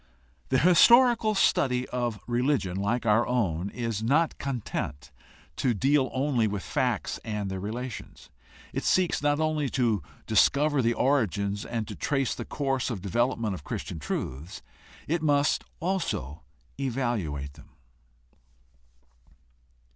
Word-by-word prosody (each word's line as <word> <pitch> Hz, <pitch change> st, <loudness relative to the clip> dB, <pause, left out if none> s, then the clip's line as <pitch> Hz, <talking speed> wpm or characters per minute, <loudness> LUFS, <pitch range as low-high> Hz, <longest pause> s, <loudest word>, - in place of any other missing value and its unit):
The 130 Hz, -, +3 dB
historical 225 Hz, -, +6 dB
study 125 Hz, -9 st, +2 dB
of 120 Hz, -2 st, -1 dB
a -, -, -14 dB
religion 120 Hz, -6 st, 0 dB
like 105 Hz, +5 st, -1 dB
our 110 Hz, +2 st, +3 dB
own 100 Hz, -7 st, 0 dB
is 115 Hz, -3 st, -3 dB
not 150 Hz, +8 st, +2 dB
content 85 Hz, -, -4 dB, 0.5 s
to 125 Hz, -3 st, +1 dB
deal 135 Hz, +4 st, +2 dB
only 130 Hz, -4 st, +1 dB
with 100 Hz, -2 st, -3 dB
facts -, -, -1 dB
and 105 Hz, -3 st, -3 dB
their 95 Hz, -, -4 dB
relations. 120 Hz, +5 st, -7 dB, 0.4 s
It -, -, -2 dB
seeks 180 Hz, -5 st, +2 dB
not 145 Hz, 0 st, +2 dB
only 155 Hz, -3 st, 0 dB
to 115 Hz, -7 st, +1 dB, 0.2 s
discover 145 Hz, -1 st, +3 dB
the 120 Hz, 0 st, +1 dB
origins 105 Hz, -7 st, +1 dB
and 115 Hz, -3 st, -3 dB
to -, -, -6 dB
trace 135 Hz, -3 st, -1 dB
the -, -, -6 dB
course 135 Hz, -3 st, -1 dB
of 105 Hz, -7 st, -5 dB
development 115 Hz, +1 st, 0 dB
of 85 Hz, -6 st, -7 dB
Christian 80 Hz, -, -5 dB
truths; 70 Hz, +3 st, -5 dB, 0.4 s
it 165 Hz, +2 st, 0 dB
must 145 Hz, -1 st, +2 dB, 0.2 s
also 165 Hz, -, -2 dB, 0.4 s
evaluate 115 Hz, -, -2 dB
them. 75 Hz, -1 st, -17 dB
120 Hz, 130 wpm, -27 LUFS, 100-140 Hz, 0.5 s, historical